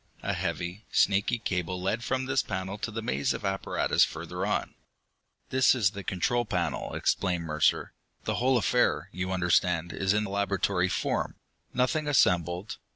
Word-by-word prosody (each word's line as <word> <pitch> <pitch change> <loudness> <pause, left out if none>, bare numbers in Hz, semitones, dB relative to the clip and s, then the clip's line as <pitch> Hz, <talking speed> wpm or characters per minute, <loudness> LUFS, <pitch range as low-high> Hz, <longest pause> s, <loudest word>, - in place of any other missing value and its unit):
A - - 0
heavy, 90 +5 -3
snaky 100 +4 +3
cable 90 -4 -2
led 100 +6 -1
from 130 +1 -1
this 135 0 +2
panel 95 0 -4
to 115 - -3
the 110 +1 -5
maze 70 -7 0
of - - -6
apparatus 95 0 +1
further - - -3
on. - - -1 0.8
"This 130 0 +5
is 105 -7 +2
the 100 -1 -7
control 120 +7 0
panel," 110 - -2
explained 90 -3 0
Mercer. 75 -2 +1 0.3
"The - - -1
whole 130 0 +4
affair, 120 +1 +2
you 95 0 -3
understand, 90 -1 +1
is 95 0 0
in 105 +1 +2
laboratory 100 -2 0
form. - - -1 0.4
Nothing 150 +5 0
assembled. 90 - +2
95 Hz, 155 wpm, -28 LUFS, 90-115 Hz, 0.8 s, This